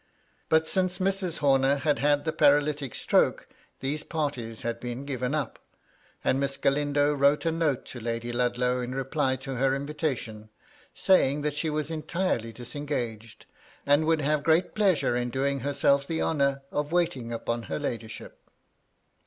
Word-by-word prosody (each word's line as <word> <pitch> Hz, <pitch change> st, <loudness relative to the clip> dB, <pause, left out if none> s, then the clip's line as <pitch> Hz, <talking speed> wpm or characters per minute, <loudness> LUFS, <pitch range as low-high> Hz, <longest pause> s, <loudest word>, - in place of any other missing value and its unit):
But 160 Hz, 0 st, +3 dB
since 185 Hz, 0 st, +3 dB
Mrs. 190 Hz, -2 st, +1 dB
Homer 135 Hz, 0 st, +4 dB
had 145 Hz, +1 st, 0 dB
had 145 Hz, +1 st, +2 dB
the 160 Hz, -, -1 dB
paralytic 145 Hz, -2 st, +2 dB
stroke -, -, +1 dB, 0.3 s
these 145 Hz, +3 st, -2 dB
parties 140 Hz, -9 st, -4 dB
had 115 Hz, 0 st, -3 dB
been 125 Hz, +3 st, -5 dB
given 130 Hz, 0 st, -2 dB
up; 150 Hz, -, -3 dB, 0.6 s
and 135 Hz, -, +2 dB
Miss 140 Hz, 0 st, -1 dB
Galindo 145 Hz, +1 st, +2 dB
wrote 140 Hz, +2 st, +3 dB
a 165 Hz, -, +2 dB
note 160 Hz, -5 st, 0 dB
to 125 Hz, -, -8 dB
Lady 115 Hz, +1 st, -3 dB
Ludlow 125 Hz, +1 st, 0 dB
in 125 Hz, +1 st, -4 dB
reply 135 Hz, 0 st, 0 dB
to 130 Hz, 0 st, -6 dB
her 135 Hz, +1 st, +2 dB
invitation, 135 Hz, -7 st, -4 dB, 0.5 s
saying 145 Hz, -6 st, +3 dB
that 150 Hz, -1 st, 0 dB
she 155 Hz, +2 st, -2 dB
was 155 Hz, 0 st, -2 dB
entirely 160 Hz, -7 st, -2 dB
disengaged, 120 Hz, -3 st, -5 dB, 0.4 s
and 145 Hz, +2 st, +4 dB
would 160 Hz, -1 st, +2 dB
have 150 Hz, +1 st, +1 dB
great 160 Hz, +4 st, +2 dB
pleasure 190 Hz, -, +2 dB
in 120 Hz, 0 st, -1 dB
doing 135 Hz, +2 st, -1 dB
herself 140 Hz, +1 st, +1 dB
the 160 Hz, -1 st, -2 dB
honour 140 Hz, -3 st, 0 dB
of 145 Hz, +1 st, -2 dB
waiting 150 Hz, -9 st, 0 dB
upon 115 Hz, 0 st, -2 dB
her -, -, -2 dB
ladyship. 115 Hz, -6 st, -6 dB
140 Hz, 155 wpm, -27 LUFS, 125-150 Hz, 0.6 s, Homer